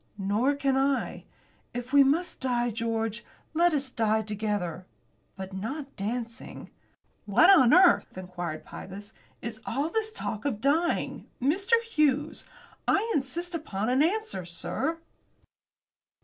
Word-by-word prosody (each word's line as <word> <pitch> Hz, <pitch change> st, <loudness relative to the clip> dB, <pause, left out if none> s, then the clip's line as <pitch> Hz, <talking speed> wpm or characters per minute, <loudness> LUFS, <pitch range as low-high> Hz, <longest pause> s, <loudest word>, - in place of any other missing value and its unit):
"Nor 215 Hz, +8 st, +1 dB
can 275 Hz, -1 st, +1 dB
I. 270 Hz, 0 st, 0 dB, 0.5 s
If 245 Hz, +2 st, -5 dB
we 280 Hz, -1 st, +8 dB
must 315 Hz, +6 st, 0 dB
die, 240 Hz, -2 st, 0 dB
George, 225 Hz, 0 st, -2 dB, 0.3 s
let 345 Hz, +2 st, +4 dB
us 275 Hz, -4 st, -1 dB
die 220 Hz, -2 st, +1 dB
together; 205 Hz, -4 st, -3 dB, 0.5 s
but 190 Hz, 0 st, -7 dB
not 270 Hz, +9 st, -5 dB
dancing." 230 Hz, +3 st, -5 dB, 0.6 s
"What 275 Hz, -, +6 dB
on 265 Hz, -11 st, +7 dB
earth," 360 Hz, -, +5 dB
inquired 175 Hz, -4 st, -5 dB
Pybus, 205 Hz, +3 st, -9 dB, 0.3 s
"is 225 Hz, -2 st, -5 dB
all 280 Hz, +6 st, -1 dB
this 440 Hz, +3 st, -1 dB
talk 215 Hz, -, -4 dB
of 265 Hz, -8 st, -1 dB
dying, 310 Hz, +7 st, 0 dB
Mr. 390 Hz, -, +3 dB
Hughes? 305 Hz, -, +1 dB, 0.4 s
I 445 Hz, +3 st, +2 dB
insist 335 Hz, +6 st, -2 dB
upon 220 Hz, -, -2 dB
an 260 Hz, +2 st, +3 dB
answer, 405 Hz, -, 0 dB
sir." 175 Hz, -, -3 dB
255 Hz, 125 wpm, -28 LUFS, 215-310 Hz, 0.6 s, we